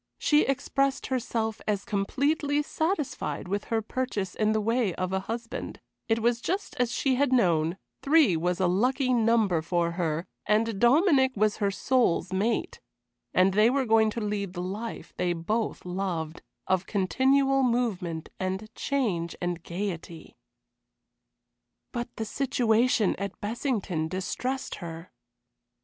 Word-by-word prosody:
She 300 0 +4
expressed 275 0 0
herself 225 -3 -2
as 205 -2 0
completely 285 +8 0
satisfied 315 - -2
with 200 +2 -2
her 225 -1 -1
purchase 215 -6 -3
in 215 0 +1
the 220 - +2
way 225 -3 +1
of 185 0 -2
a 190 - +1
husband; 230 +4 -5 0.3
it 225 - +2
was 235 0 +2
just 385 - -2
as 245 -2 +2
she 270 - +1
had 280 -1 +2
known, 170 -8 +2 0.2
three 285 - +4
was 175 +3 0
a 185 - +2
lucky 250 +8 +2
number 225 -7 +3
for 170 +1 0
her, 170 -1 -1 0.2
and 215 -1 +2
Dominic 265 - +4
was 215 0 +2
her 205 -2 +1
soul's 195 -3 +1
mate, 215 +5 0 0.5
and 185 +1 +4
they 215 +3 +5
were 270 +1 +1
going 220 -1 +4
to 230 +2 -4
lead 205 -3 -2
the 175 -1 -4
life 210 +5 -6
they 180 -1 +1
both 210 +8 -2
loved, 180 -4 -3 0.2
of 185 0 0
continual 270 +7 +2
movement 215 -10 -1
and 190 +4 -3
change 205 -15 -1
and 175 -1 -2
gayety. 170 -3 -6 1.6
But 240 0 -5
the 220 - -3
situation 240 -2 +2
at 200 -1 -5
Bessington 205 - -2
distressed 250 +9 -3
her. 165 0 -8
215 Hz, 140 wpm, -27 LUFS, 185-250 Hz, 1.6 s, they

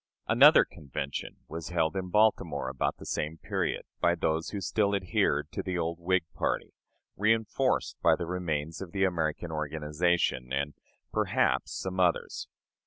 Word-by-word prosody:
Another - - +7
convention 70 -1 -5
was 80 0 -6
held 85 -1 +1
in 95 -1 -3
Baltimore 95 -10 +2
about 65 - -1
the - - -11
same 75 +2 -2
period - - -2 0.2
by 85 - +3
those 80 -1 0
who 100 - -4
still 100 +1 +1
adhered 80 -5 0
to - - -3
the 90 -2 -3
old 85 0 -2
Whig 95 +1 +1
party, - - -2 0.5
reënforced 110 +5 +1
by - - +5
the 85 - -4
remains 80 -3 -3
of 95 -2 -7
the 100 -1 +1
"American" 85 -2 0
organization, 75 -3 0
and 70 +2 -1 0.4
perhaps - - +1
some 95 0 -4
others. 90 -2 +1
85 Hz, 150 wpm, -29 LUFS, 75-95 Hz, 0.5 s, Another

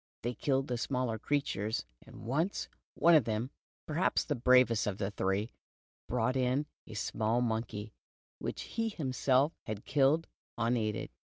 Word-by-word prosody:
They 120 +2 -1
killed 135 +3 0
the 125 -2 -2
smaller 125 -4 -1
creatures, 110 -6 -1 0.2
and - - -12
once, 155 - 0 0.3
one 170 - +5
of 150 -8 +6
them, 115 +4 -2 0.3
perhaps 160 +4 +1
the 150 - -1
bravest 125 -3 +4
of 100 -2 -1
the 100 0 -2
three, 100 +3 -1 0.6
brought 125 +1 +1
in 130 +3 +1 0.2
a 110 - -9
small 110 +2 0
monkey, 110 -3 -2 0.5
which - - -4
he 225 -1 -2
himself 135 - +1
had 105 -2 -5
killed, 145 +4 +3 0.3
unaided. 115 -2 0
125 Hz, 145 wpm, -32 LUFS, 110-140 Hz, 0.6 s, of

